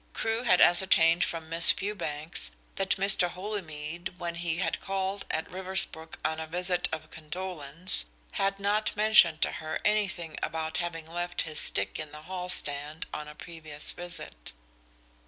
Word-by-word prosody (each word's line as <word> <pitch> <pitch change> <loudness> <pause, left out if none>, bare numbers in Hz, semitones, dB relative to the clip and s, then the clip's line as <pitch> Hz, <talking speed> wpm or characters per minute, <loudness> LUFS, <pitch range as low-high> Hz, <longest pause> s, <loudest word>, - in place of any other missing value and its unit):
Crewe 225 +1 -1
had 220 -7 +4
ascertained 175 -1 +6
from 165 -1 -3
Miss 165 +1 +4
Fewbanks 170 -6 -2 0.2
that 195 0 +1
Mr. 195 -2 +5
Holymead 175 -3 -5
when 175 -1 -4
he 170 -1 -2
had 185 - -1
called 195 +1 -3
at 160 - -1
Riversbrook 185 -3 -2
on 160 - 0
a 160 - -5
visit 180 +2 0
of 155 -1 -6
condolence 160 - -3 0.3
had 195 0 0
not 210 +2 0
mentioned 210 -7 +6
to - - +2
her 155 0 -3
anything 190 -6 0
about 160 0 -2
having 165 -2 -3
left 175 +2 -3
his 155 -1 -2
stick 100 - +2
in 155 -1 -5
the 150 0 -10
hall 180 +1 -5
stand 145 -1 -2
on 150 0 -5
a 150 - -10
previous 155 -2 -3
visit. 170 - -3
170 Hz, 155 wpm, -29 LUFS, 155-190 Hz, 0.3 s, ascertained